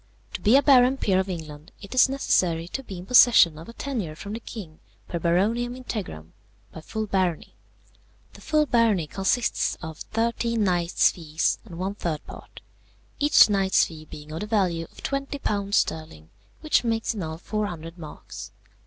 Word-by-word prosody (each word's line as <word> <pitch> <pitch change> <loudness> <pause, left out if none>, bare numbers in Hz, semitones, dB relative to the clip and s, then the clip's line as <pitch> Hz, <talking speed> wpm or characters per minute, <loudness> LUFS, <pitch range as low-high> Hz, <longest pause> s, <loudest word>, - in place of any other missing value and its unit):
To - - -5
be 220 +4 +4
a 285 - +3
baron 260 -1 +5
peer 190 -7 +1
of 190 +1 -2
England, 155 -2 -7
it 200 - -10
is 255 +1 +5
necessary 175 -11 +1
to 270 - -4
be 200 -8 -9
in 175 - -9
possession 210 -9 +6
of 165 - -11
a - - -9
tenure 230 - -4
from 200 +6 -7
the 225 - -4
king 190 -9 -9 0.3
per 170 - -4
Baroniam 215 +9 +1
integram, 180 - -6 0.4
by 160 - -10
full 220 +7 -4
barony. 185 -5 -1 0.8
The - - -15
full 305 -1 +2
barony 230 - +2
consists 195 +8 0
of 160 -2 -8
thirteen 230 0 -1
knights' 175 -2 +2
fees 160 -2 -1
and 175 -6 -10
one 190 +3 -2
third 170 -7 -4
part, - - -12 0.6
each 295 +1 +6
knight's 195 -2 +3
fee 155 -2 -10
being 150 0 -11
of 160 - -5
the 210 - -5
value 185 -6 0
of - - -17
£20 275 -8 -2
sterling, 155 - -1 0.3
which 310 -4 +2
makes 225 0 -1
in 210 - -5
all 160 -1 -5
400 175 -4 -5
marks. 155 -2 -9
195 Hz, 170 wpm, -25 LUFS, 165-230 Hz, 0.8 s, possession